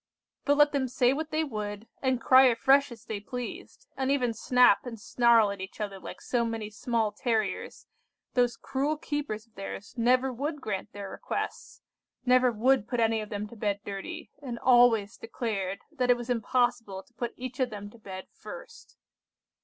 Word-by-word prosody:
But 285 0 +3
let 295 0 +6
them 275 -2 0
say 250 0 +3
what 310 +2 -3
they 310 +1 0
would, 210 -5 -5
and 260 -2 +1
cry 260 +3 +7
afresh 270 +3 +4
as 235 0 -11
they 220 -4 -4
pleased, 245 - -7
and 265 0 -1
even 250 -4 +2
snap 245 -1 +4
and 235 -3 -7
snarl 230 -1 +4
at 200 -1 -6
each 190 +3 -8
other 200 -2 -4
like - - -9
so 240 -2 0
many 225 -2 -3
small 225 0 0
terriers, 220 -1 -2 0.5
those 245 -1 +2
cruel 285 +3 -1
keepers 290 -8 -4
of 225 - -36
theirs 195 0 -7
never 255 +2 +3
would 290 +5 -3
grant 210 -7 -4
their 200 -1 -7
requests; - - -5 0.4
never 250 0 +5
would 235 +1 +2
put 245 -1 -2
any 225 -1 +2
of 210 - -7
them 210 0 -4
to 235 - -12
bed 205 -2 -1
dirty, 205 - -6
and 250 -4 -5
always 240 -5 +4
declared 210 -4 -3
that 255 -5 -1
it 245 - +6
was 240 +1 -4
impossible 230 -4 0
to - - -30
put 240 -1 -4
each 255 0 -7
of 255 -1 +2
them 205 -2 -8
to 235 - -17
bed 190 -3 -8
first! 465 0 -11
235 Hz, 185 wpm, -28 LUFS, 210-260 Hz, 0.5 s, cry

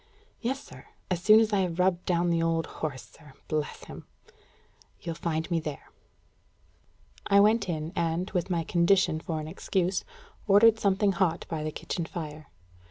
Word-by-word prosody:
"Yes, 260 +3 -1
sir. - - -14 0.2
As 175 -1 0
soon 215 +3 +7
as 220 -1 +1
I 200 - +3
have 180 -3 -1
rubbed 180 -1 +1
down 175 -1 +1
the 165 -1 +1
old 165 0 +1
horse, 145 -5 -6
sir 150 -3 -18
bless 155 -1 -3
him!" - - -11 0.9
"You'll 170 - -5
find 160 -1 -2
me 170 - +2
there." 150 -3 -7 1.4
I 200 - +5
went 210 0 +3
in, 160 0 -3
and, 170 +2 -1
with 180 -1 -1
my 170 -2 0
condition 170 0 +2
for 160 -1 -4
an 155 - -6
excuse, 185 +2 -1 0.4
ordered 220 +2 +6
something 200 0 +2
hot 175 -3 0
by 155 -2 -3
the 155 - -2
kitchen 170 +2 -4
fire. 155 -4 -7
170 Hz, 165 wpm, -28 LUFS, 160-195 Hz, 1.4 s, soon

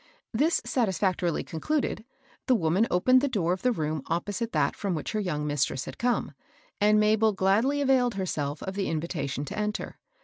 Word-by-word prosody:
This 300 +9 +2
satisfac 190 -6 0
torily 170 -3 -1
concluded, 240 - -2 0.4
the 255 - +5
woman 185 +3 +2
opened 255 +8 +4
the 285 - +1
door 185 -9 0
of 185 - -6
a 250 - +3
room 155 - -2
opposite 205 +7 -2
that - - +1
from 195 -4 -2
which 155 - -4
her 215 - -1
young 160 -7 -2
mistress 145 -2 -1
had - - -9
come, 245 0 0 0.5
and 210 +1 +4
Mabel 215 0 +3
gladly 215 +10 +2
availed 255 -4 +3
herself 150 -6 -3
of 190 - -4
the 195 0 -2
invitation 150 -4 -3
to - - -6
enter. 210 0 -3
200 Hz, 180 wpm, -27 LUFS, 165-230 Hz, 0.5 s, the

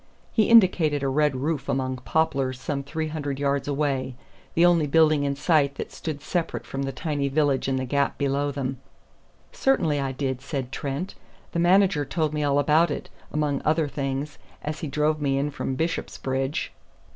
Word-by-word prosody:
He 215 -3 +2
indicated 175 -10 +5
a - - +1
red 145 +1 +2
roof 145 +3 -2
among 130 -1 -1
poplars 135 -2 0
some 140 +1 -2
three 155 +3 -3
hundred 145 -3 -3
yards 140 0 0
away, 140 -3 -1 0.4
the 170 - +5
only 170 -4 +4
building 155 -1 +4
in 140 0 0
sight 145 -2 +2
that - - -6
stood 150 -3 -5
separate 170 +1 -2
from 135 - -4
the 135 0 -2
tiny 145 +1 -2
village 140 -2 +1
in 135 - +1
the 130 0 -1
gap 140 +2 0
below 140 0 0
them. 135 -2 -3 0.7
"Certainly 165 - +1
I 135 -1 -1
did," 130 -1 -3
said 135 -2 -4
Trent. 140 +8 -4 0.4
"The 170 - -1
manager 180 -3 +4
told 150 +2 -1
me 150 - -1
all 140 -1 +2
about 155 +4 +4
it, - - -5 0.2
among 150 -2 0
other 155 0 +2
things, 135 +1 -3 0.2
as 150 +1 -4
he 155 - -4
drove 150 +2 0
me 135 -1 +1
in 145 +2 0
from 135 -1 -3
Bishopsbridge." 135 -2 -2
145 Hz, 180 wpm, -25 LUFS, 135-155 Hz, 0.7 s, indicated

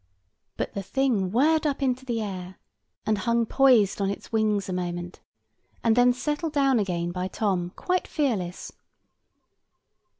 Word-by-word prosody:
But - - -3
the 200 - -3
thing 215 -2 0
whirred 305 +7 +3
up 280 -1 -2
into 260 0 0
the 230 -3 -1
air, 185 -2 -6 0.5
and 215 -2 +1
hung 235 +3 +1
poised 230 -6 +4
on 195 - +1
its 200 - -6
wings 215 -3 +1
a 185 - -3
moment, 175 0 -4 0.6
and 225 -1 +4
then 245 0 +5
settled 295 +5 -2
down 275 -4 +3
again 175 -4 -1
by 180 +1 -3
Tom 185 -3 -1
quite 365 -1 -1
fearless. 210 - -2
220 Hz, 145 wpm, -26 LUFS, 185-265 Hz, 0.6 s, then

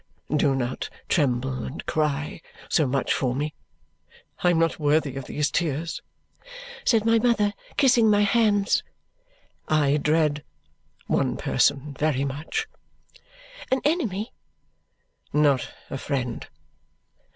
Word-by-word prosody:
Do 145 -2 +3
not 130 -1 -3 0.2
tremble 130 -4 +1
and 135 - -6
cry 150 0 -1 0.3
so 155 -4 +3
much 135 +1 0
for 125 -2 0
me. 150 +3 -2 0.9
I 175 - +5
am 175 - +3
not 165 0 +1
worthy 150 -2 +1
of 135 -1 -5
these 145 -1 -1
tears," 160 +1 -1 0.8
said 225 -2 +3
my 230 0 +4
mother, 215 -3 +2 0.2
kissing 245 -5 +5
my 205 -1 +4
hands. 205 -1 +3 0.9
"I 150 -2 +3
dread 150 -1 +1 0.6
one - - 0
person 145 +1 +1
very 140 -1 0
much." 150 - -3 1.0
"An 260 - +2
enemy?" 235 - 0 1.0
"Not 145 -3 +3 0.2
a 135 - -3
friend. 130 -5 -3
150 Hz, 115 wpm, -25 LUFS, 140-205 Hz, 1.0 s, I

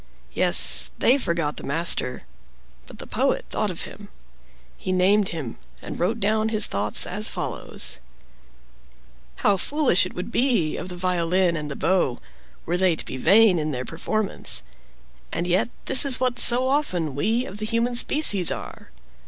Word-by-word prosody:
Yes, - - +4
they 265 +4 +3
forgot 170 - -2
the - - -8
master; 140 -4 0 0.6
but - - -13
the - - -9
Poet - - -1
thought - - -1
of - - -5
him. - - -11 0.7
He 185 - -5
named 190 +2 +3
him, 150 -9 -6 0.2
and - - -8
wrote 215 +7 0
down 215 +1 +1
his 215 -1 +4
thoughts 105 +1 0
as 210 +4 -1
follows: - - -5 1.5
"How 200 - +4
foolish 265 - +1
it - - -13
would 180 +5 -6
be 235 - +1
of 185 - -6
the 180 - -6
violin 180 0 +1
and 150 -2 -4
the 140 - -5
bow, 175 -10 0 0.5
were 175 +2 -1
they 185 -2 +2
to - - -5
be 130 - -6
vain 200 - +5
in 155 0 -2
their 130 -3 -4
performance! 190 - -2 0.7
And 170 - -2
yet 180 +5 +1 0.2
this 265 - +6
is 275 -3 +2
what 250 -1 -1
so 245 +2 +5
often 185 - -1
we 225 - 0
of 210 -6 -8
the 215 - -3
human 235 +2 0
species 235 - +2
are. - - -8
185 Hz, 165 wpm, -23 LUFS, 165-230 Hz, 1.5 s, this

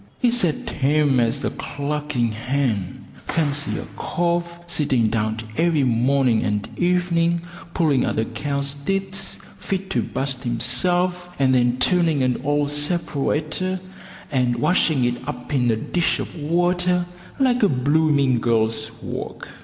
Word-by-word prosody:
It's 245 -1 +4
as 160 -4 +2
tame 145 -1 +2
as 115 -1 0
a - - 0
clucking 145 -4 -2
hen. 115 -4 -2 0.2
Fancy 145 -2 0
a - - -5
cove 170 0 -1
sitting 145 -9 +1
down 110 0 -1 0.2
every 165 -3 +3
morning 125 -1 +2
and 105 -1 -1
evening 170 -1 +1 0.3
pulling 150 -6 +3
at - - -1
a 110 - +1
cow's 140 +4 -2
tits 195 +6 -3 0.2
fit 190 0 -3
to - - +1
bust 135 -1 -3
himself, 180 +9 0
and 130 -1 +3
then 125 -1 +3
turning 165 -1 +2
an 125 -1 0
old 145 0 +1
separator, 155 +3 0 0.5
and 125 -3 +1
washing 145 0 +2
it 120 0 -1
up 125 0 -5
in 125 -3 +2
a 115 - +3
dish 170 +9 0
of - - -5
water 175 +3 +1 0.3
like 255 -2 +2
a 205 - +5
blooming 140 -1 +2
girl's 110 -1 +1
work. - - -6
145 Hz, 135 wpm, -22 LUFS, 125-170 Hz, 0.5 s, a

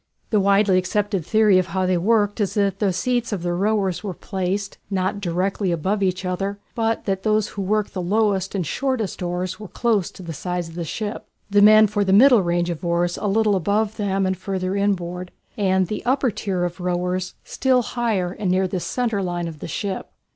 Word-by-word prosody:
The 215 - +4
widely 195 -1 +4
accepted 195 0 -1
theory 210 +1 +4
of 185 - -1
how 190 0 -1
they 185 0 +2
were 225 +6 +3
worked 205 +2 -3
is 200 +1 -1
that 200 -2 +1
the 200 -3 +2
seats 240 +6 -1
of 195 -5 -3
the 175 0 -1
rowers 195 0 0
were 195 -4 -4
placed, 195 +2 -3
not 190 +1 -1
directly 185 +1 -1
above 185 +5 -1
each 185 0 0
other, 195 +2 -2 0.2
but 225 -1 -1
that 195 -1 -1
those 215 0 +1
who 200 - -5
worked 210 +2 0
the 185 - -3
lowest 195 0 +1
and 185 -4 -1
shortest 250 - -2
oars 180 +1 -3
were 210 - -8
close 215 -3 0
to 185 - -12
the 165 -1 -6
side 180 +4 -3
of 165 - -11
the 170 0 -4
ship, 210 +6 -5 0.2
the 205 0 +5
men 215 +1 +8
for 205 0 0
the 190 -1 +1
middle 245 +1 +7
range 175 0 0
of 170 - -6
oars 175 0 0
a 210 - -2
little 210 0 +2
above 205 +4 0
them 195 -2 0
and 185 0 0
further 185 0 -3
inboard, 180 -3 -1 0.3
and 190 -2 +2
the 210 +4 -5
upper 260 0 +1
tier 190 -3 -2
of 175 +1 -3
rowers 180 +1 -2
still 255 -1 +1
higher 220 -8 -1
and 195 0 -3
near 185 +1 +2
the 185 0 -2
centre 230 +1 -1
line 175 -2 -2
of 160 -2 -8
the - - -6
ship. 190 +4 -3
195 Hz, 210 wpm, -22 LUFS, 180-210 Hz, 0.3 s, men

